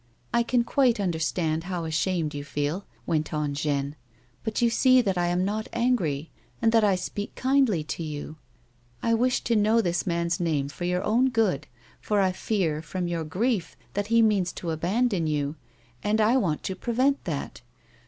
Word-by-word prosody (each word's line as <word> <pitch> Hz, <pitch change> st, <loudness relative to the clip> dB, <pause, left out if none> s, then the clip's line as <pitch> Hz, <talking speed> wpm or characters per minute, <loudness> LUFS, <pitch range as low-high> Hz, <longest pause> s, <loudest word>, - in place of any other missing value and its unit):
" -, -, -39 dB
I 235 Hz, -, +4 dB
can 235 Hz, +1 st, +2 dB
quite 245 Hz, -2 st, +2 dB
understand 165 Hz, -2 st, -1 dB
how 180 Hz, -3 st, -3 dB
ashamed 160 Hz, 0 st, 0 dB
you 145 Hz, 0 st, -5 dB
feel," 145 Hz, +6 st, -3 dB, 0.2 s
went 155 Hz, -2 st, 0 dB
on 150 Hz, -1 st, -1 dB
Jeanne, 140 Hz, 0 st, -1 dB, 0.2 s
" 125 Hz, 0 st, -35 dB
but 220 Hz, -1 st, -2 dB
you 240 Hz, -, +4 dB
see 255 Hz, +2 st, +5 dB
that 200 Hz, -6 st, +1 dB
I 175 Hz, -1 st, +1 dB
am 175 Hz, +1 st, +1 dB
not 215 Hz, +2 st, -2 dB
angry, 185 Hz, -, 0 dB, 0.3 s
and 225 Hz, -1 st, +3 dB
that 225 Hz, -1 st, +4 dB
I 200 Hz, -2 st, +4 dB
speak 205 Hz, +3 st, -5 dB
kindly 260 Hz, -, +2 dB
to 155 Hz, -, -5 dB
you. 155 Hz, 0 st, -5 dB, 0.7 s
I 230 Hz, -, +2 dB
wish 245 Hz, +2 st, +2 dB
to 235 Hz, -, 0 dB
know 215 Hz, +2 st, +4 dB
this 175 Hz, -5 st, 0 dB
man's 170 Hz, 0 st, 0 dB
name 150 Hz, -5 st, 0 dB
for 175 Hz, +4 st, -5 dB
your 180 Hz, +1 st, 0 dB
own 240 Hz, +5 st, +3 dB
good, 225 Hz, -, +1 dB, 0.3 s
for 210 Hz, -1 st, +1 dB
I 190 Hz, -1 st, +3 dB
fear, 180 Hz, -5 st, -1 dB
from 175 Hz, +2 st, -3 dB
your 170 Hz, -1 st, -2 dB
grief, 190 Hz, +4 st, -1 dB, 0.2 s
that 205 Hz, 0 st, -1 dB
he 230 Hz, +1 st, +4 dB
means 200 Hz, -5 st, +2 dB
to 170 Hz, -, -4 dB
abandon 185 Hz, +2 st, 0 dB
you, 145 Hz, -1 st, -1 dB, 0.5 s
and 210 Hz, +1 st, +1 dB
I 220 Hz, +3 st, +4 dB
want 175 Hz, -, 0 dB
to 190 Hz, -, -3 dB
prevent 255 Hz, +7 st, +1 dB
that. 150 Hz, -7 st, -4 dB
185 Hz, 190 wpm, -26 LUFS, 160-225 Hz, 0.7 s, see